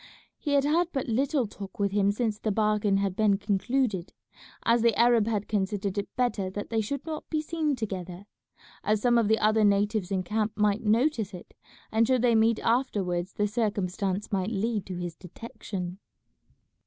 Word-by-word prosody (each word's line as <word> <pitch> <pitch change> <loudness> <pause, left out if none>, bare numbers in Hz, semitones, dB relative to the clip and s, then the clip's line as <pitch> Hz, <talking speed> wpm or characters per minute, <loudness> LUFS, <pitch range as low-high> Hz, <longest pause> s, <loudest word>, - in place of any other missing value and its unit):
He 290 - -2
had 280 -1 +4
had 325 +4 +2
but 270 -3 -2
little 265 +3 +1
talk 205 +1 -9
with 200 -2 0
him 200 0 +2
since 215 -1 -1
the 215 - -1
bargain 210 -1 +2
had 195 -2 -1
been 205 -1 +3
concluded, 205 -1 -1 0.5
as 230 0 +3
the 230 -2 +3
Arab 235 -2 +4
had 210 -3 -1
considered 200 -1 -1
it 200 -1 -3
better 240 -6 0
that 205 +3 -6
they 225 -1 +1
should 275 +7 -4
not 315 -2 -6
be 310 - 0
seen 310 -1 -1
together, 190 -5 -5 0.6
as 215 0 +2
some 240 +1 +3
of 225 - +2
the 220 +1 +3
other 215 +1 +3
natives 205 -1 +2
in 190 -2 -1
camp 215 +3 -1
might 210 0 +2
notice 225 -2 +1
it, 180 - -12 0.4
and 225 +1 +3
should 255 -2 +2
they 240 -1 +4
meet 225 0 +4
afterwards 195 -7 0
the 205 - 0
circumstance 200 -3 -2
might 195 0 0
lead 220 -1 -1
to 185 - -5
his 175 -1 -5
detection. 185 -1 -7
210 Hz, 180 wpm, -27 LUFS, 195-235 Hz, 0.6 s, had